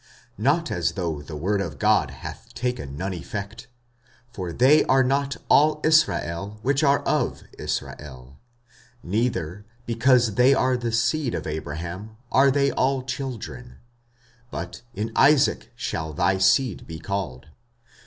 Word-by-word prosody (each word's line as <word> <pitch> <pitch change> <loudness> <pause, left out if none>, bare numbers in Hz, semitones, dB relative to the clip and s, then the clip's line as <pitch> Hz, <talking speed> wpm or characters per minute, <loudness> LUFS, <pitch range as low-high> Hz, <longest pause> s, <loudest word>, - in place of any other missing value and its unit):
45:009:006 105 - -8
Not 165 +4 +2
as 85 -2 0
though 85 -6 -3
the 75 +1 -9
word 100 +7 0
of 85 -6 -5
God 105 - +3
hath 65 - -10
taken 100 - -3
none 95 +3 -3
effect. 100 +7 -7 0.7
For 95 -6 -5
they 135 - +5
are 130 0 +4
not 140 +1 0
all 150 +1 +4
Israel, 105 - +2
which 140 +3 +1
are 140 -1 +3
of 145 -3 -1 0.2
Israel: 65 -2 -6 0.7
45:009:007 85 - -8
Neither, 105 -4 -1 0.2
because 120 -1 +3
they 125 +5 +5
are 130 0 +2
the 120 -2 -2
seed 115 +4 0
of - - -4
Abraham, 85 +7 -6
are 135 +1 +5
they 140 0 +2
all 130 0 0
children: 125 -2 -6 0.7
but, 85 -3 -6
In 110 +3 -3
Isaac 135 -4 +4
shall 80 -9 -4
thy 95 +6 +1
seed 115 +3 +2
be 80 - -7
called. 80 -7 -5
110 Hz, 145 wpm, -24 LUFS, 85-130 Hz, 0.7 s, they